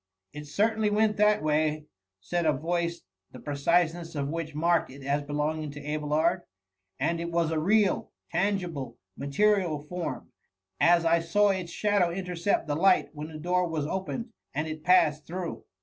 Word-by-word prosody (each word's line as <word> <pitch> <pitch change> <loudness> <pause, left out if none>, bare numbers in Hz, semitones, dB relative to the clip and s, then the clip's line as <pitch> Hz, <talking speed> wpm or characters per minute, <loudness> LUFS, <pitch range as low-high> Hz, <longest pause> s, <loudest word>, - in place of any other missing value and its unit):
" 95 0 -49
It 150 0 -8
certainly 215 +6 +1
went 210 0 +2
that 210 -5 +3
way,^ 155 0 +1 0.4
said 175 - -1
a 155 - +4
voice, 170 +4 -2 0.3
the 125 - -11
predseness 165 +4 0
of 140 -1 -2
which 160 -1 -4
marked 170 +2 +2
it 135 +1 -11
as 140 +2 0
belonging 150 +2 -2
to 145 0 -9
Abelard; 155 +4 +1 0.6
and 165 +5 0
it 170 0 -3
was 170 -1 +1
a 160 - 0
real, 200 +4 +2 0.2
tengible, 175 - -1 0.2
ma> 140 - -6
terial 170 -2 +1
form, 180 -1 -5 0.5
as 170 0 +5
I 165 +1 +4
saw 205 +5 +2
its 185 -3 -3
shadow 205 -3 +2
intercept 180 0 -1
Uie 145 0 -1
light 190 +1 +4
when 150 0 -6
the 160 -1 -8
door 180 +3 +1
was 160 -3 -2
opened 190 - -4 0.2
and 150 +2 -1
it 155 0 -6
passed 155 -4 +3
through." 175 0 -5
165 Hz, 170 wpm, -28 LUFS, 150-180 Hz, 0.6 s, as